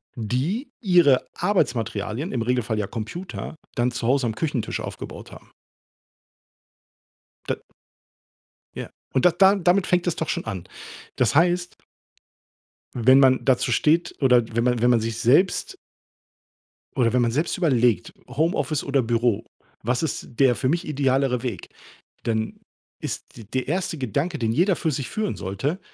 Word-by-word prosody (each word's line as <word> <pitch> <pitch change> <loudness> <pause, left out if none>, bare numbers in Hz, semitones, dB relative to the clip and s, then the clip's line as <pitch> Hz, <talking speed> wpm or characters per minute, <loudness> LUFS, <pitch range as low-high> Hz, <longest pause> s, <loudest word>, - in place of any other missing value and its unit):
die 140 - -2
ihre 175 - +4
Arbeitsmaterialien, 125 - -1
im 120 -3 -1
Regelfall 120 -2 0
ja 105 - 0
Computer, 120 - -6 0.2
dann 120 +1 +2
zu 120 -1 -4
Hause 130 -1 +2
am 110 - -3
Küchentisch 140 -5 -2
aufgebaut - - -8
haben. - - -14 2.0
Da - - +1 1.2
Ja, - - -6 0.2
und 130 - +2
da 180 - +7
da 195 +2 +5
damit 185 0 +2
fängt 180 0 +1
es 175 - +1
doch 160 - -3
schon - - -2
an. 95 -5 -5 0.5
Das 120 -1 +1
heißt 175 +2 +2 1.2
wenn 130 +3 +5
man 130 -1 +5
dazu 130 -3 +2
steht 165 +3 +2
oder 125 -4 +5
wenn 115 +2 +1
man 125 -2 +1
wenn 120 - +4
man 120 -2 +4
sich 115 0 -3
selbst 165 - +2 1.2
oder 120 -3 +2
wenn 125 - +3
man 115 -1 +2
selbst 155 +7 -1
überlegt: 125 - +2
„Homeoffice 155 +2 0
oder 140 -1 +1
Büro. 115 -2 0 0.4
Was 125 +5 0
ist 160 - -3
der 130 -3 +5
für 130 +4 -1
mich 170 +4 0
idealere 135 -3 +1
Weg?“ 110 -8 -5 0.5
Dann 110 -1 -2 0.4
ist - - -5 0.3
der 130 -1 -1
erste 170 +1 -1
Gedanke, 140 - -2
den 115 -1 0
jeder 180 - +3
für 160 - -1
sich 135 -2 -3
führen 215 -1 -2
sollte: 130 - -3
130 Hz, 150 wpm, -24 LUFS, 120-165 Hz, 2.0 s, da